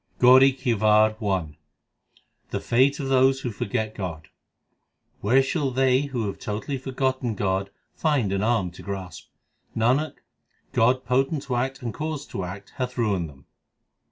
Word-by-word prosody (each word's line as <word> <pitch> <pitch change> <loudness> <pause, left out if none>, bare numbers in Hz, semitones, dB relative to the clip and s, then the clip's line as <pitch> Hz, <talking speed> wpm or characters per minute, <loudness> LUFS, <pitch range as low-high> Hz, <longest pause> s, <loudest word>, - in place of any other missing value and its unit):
GAURI 130 +2 +7
KI 130 -2 -1
WAR 110 0 +4
I 90 -8 -2 0.9
The - - -2
fate 130 +4 +2
of 135 - -3
those 135 0 +4
who 120 - -3
forget 110 +1 -2
God: 85 -6 -6 0.9
Where 130 +6 +4
shall 140 0 -1
they 130 +1 +2
who 125 -5 -2
have 100 - -5
totally 110 +6 -4
forgotten 130 -3 -1
God 95 0 -1 0.3
rind 140 -11 +2
an 100 - 0
arm 110 -5 +1
to 85 - -12
grasp? 95 -4 -7 0.5
l - - -1
Nanak, 135 +7 +2 0.6
God 125 +3 +3
potent 135 +4 +1
to 125 - -3
act 130 +2 -2
and 115 -3 -3
cause 150 +1 -4
to 95 - -4
act 95 +2 -8
hath 125 -1 -3
ruined 100 -8 0
them. 70 -2 -17
120 Hz, 155 wpm, -25 LUFS, 100-135 Hz, 0.9 s, GAURI